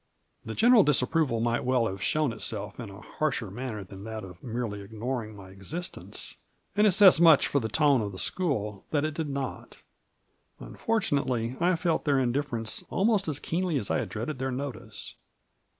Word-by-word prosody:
The 110 - -6
general 235 +1 +6
disapproval 145 -4 +2
might 120 0 0
well 125 -2 +2
have 95 -3 -4
shown 150 +5 +1
itself 105 -2 -4
in 115 -4 -6
a 100 +2 -11
harsher 125 -9 -2
manner 115 -2 -5
than 95 +1 -11
Jbhat 110 0 -6
of 90 -2 -11
merely 115 -4 -4
ignoring 110 +2 -4
my 95 -2 -12
existence 150 - -5 0.2
— - - -44
and 210 +1 +5
it 200 - +4
says 190 -3 +7
much 160 -4 +7
for 140 - +1
the 110 -3 -3
tone 145 -4 +3
of 105 -1 -3
the 95 - -9
school 105 - -2
that 145 -1 +1
it 155 - -2
did 155 -1 -3
not; 135 -2 -5 0.8
unfortunately, 140 - -1
1 175 +7 +1
felt 165 -1 0
their 140 -3 +3
indifference 120 -3 -2
almost 205 -1 +2
as 145 -2 0
keenly 175 -2 -1
as 105 - -1
I - - +2
had - - -3
dreaded 125 +6 -4
their 130 0 -1
notice. 130 -3 -6
130 Hz, 180 wpm, -28 LUFS, 110-155 Hz, 0.8 s, says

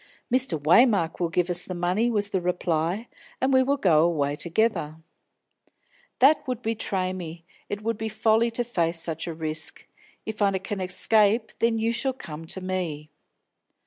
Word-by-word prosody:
"Mr. 255 - +3
Waymark 170 - +3
will 170 -2 0
give 175 +1 0
us 175 -1 +1
the 185 - -6
money," 180 +7 0
was 205 -3 0
the 190 -2 -1
reply, 175 +3 -1 0.3
"and 265 +1 +1
we 260 - +5
will 280 +2 +1
go 165 - +3
away 145 -4 0
together." 170 -2 -1 1.2
"That 285 +4 +5
would 250 -2 -4
betray 195 -4 -2
me; 170 -2 -8 0.2
it 205 +1 -5
would 230 0 -2
be 220 0 -3
folly 220 +2 +2
to 235 +1 -2
face 170 -8 0
such 165 0 -2
a 170 - -4
risk. 155 0 0 0.4
If 220 -1 -6
I 195 -1 +2
can 190 +1 -5
escape, 210 +4 +3
then 230 -1 +2
you 225 +1 0
shall 260 +3 -1
come 165 -9 -9
to 190 - -4
me." 170 -5 -4
190 Hz, 170 wpm, -25 LUFS, 170-225 Hz, 1.2 s, we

